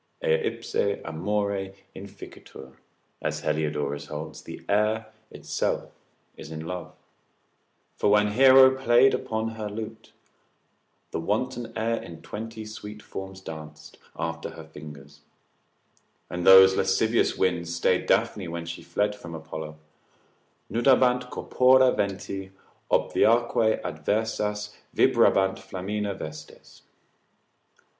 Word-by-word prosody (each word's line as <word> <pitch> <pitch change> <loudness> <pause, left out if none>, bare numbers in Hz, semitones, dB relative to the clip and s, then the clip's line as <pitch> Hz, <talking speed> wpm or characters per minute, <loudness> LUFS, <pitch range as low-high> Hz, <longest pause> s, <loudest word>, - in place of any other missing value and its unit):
Aer 475 -1 +3
ipse 430 - -4 0.3
amore 95 +3 -2 0.2
inficitur, 95 -8 -11 0.5
as - - -2
Heliodorus 75 -2 -2
holds, - - -7
the - - -10
air 110 +1 +1 0.2
itself - - -3 0.4
is - - -10
in 80 0 -7
love: 90 +1 -6 1.0
for - - +2
when 105 0 +4
Hero 130 +2 +7
plaid 130 0 +4
upon 110 0 -2
her 110 -2 -5
lute, 110 +1 -8 1.0
The - - -2
wanton 120 +7 -2
air 115 +1 0
in 80 -1 -11
twenty 110 +1 -7
sweet 105 0 -9
forms 95 0 -8
danc't 75 -1 -9 0.3
After 80 0 -4
her 80 - -10
fingers——— 75 -2 -12 1.1
and 90 0 -3
those 95 0 +9
lascivious 110 +4 +2
winds 85 -2 0
stayed 90 +2 +1
Daphne 95 -4 +1
when 85 0 -5
she 85 - -6
fled 105 0 -1
from 85 -5 -9
Apollo; 80 -1 -7 0.9
———nudabant 125 0 +3
corpora 130 0 +4
venti, 95 -1 -3 0.4
Obviaque 115 -1 +2
adversas 105 -1 -2 0.2
vibrabant 95 0 +4
flamina 95 +1 -4
vestes. 75 -1 -10
100 Hz, 105 wpm, -26 LUFS, 85-110 Hz, 1.1 s, those